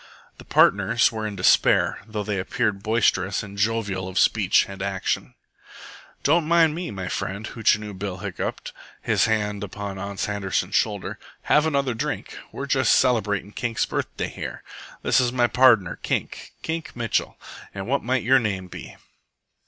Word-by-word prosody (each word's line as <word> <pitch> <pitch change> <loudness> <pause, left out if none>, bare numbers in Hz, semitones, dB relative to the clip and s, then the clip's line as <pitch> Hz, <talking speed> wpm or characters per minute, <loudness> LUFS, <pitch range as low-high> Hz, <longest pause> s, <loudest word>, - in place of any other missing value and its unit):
The - - -12
partners 105 +4 +4
were 110 -1 -3
in 105 - -6
despair, 95 - +3
though 105 -1 -4
they 100 -1 -2
appeared 100 +1 -1
boisterous 100 -3 +1
and 100 -1 -9
jovial 100 -3 -1
of 95 - -6
speech - - +3
and 95 -1 -9
action. 95 -1 -2 0.9
"Don't 160 +2 +3
mind 165 -2 +4
me, 175 +2 -4
my 95 -3 -5
friend," 100 +4 -4
Hootchinoo 105 -2 0
Bill 95 -1 -5
hiccoughed, - - -5 0.3
his - - +2
hand 105 -2 -1
upon 100 0 -6
Ans 100 0 -3
Handerson's 100 -2 -2
shoulder. - - -1 0.2
"Have 150 +1 +3
another 140 -4 0
drink. 110 - -4 0.2
We're - - -5
just - - +3
celebratin' 105 -5 0
Kink's 120 -2 -1
birthday - - -3
here. - - -7 0.4
This 135 - +4
is 120 -1 +1
my 125 -1 +2
pardner, 120 -7 +4
Kink, - - -4
Kink 160 0 -4
Mitchell. 120 -2 -1 0.4
An' 95 -1 -4
what 135 +3 0
might 125 +1 0
your 130 +3 +5
name 100 -5 -3
be?" - - -10
105 Hz, 155 wpm, -24 LUFS, 100-120 Hz, 0.9 s, your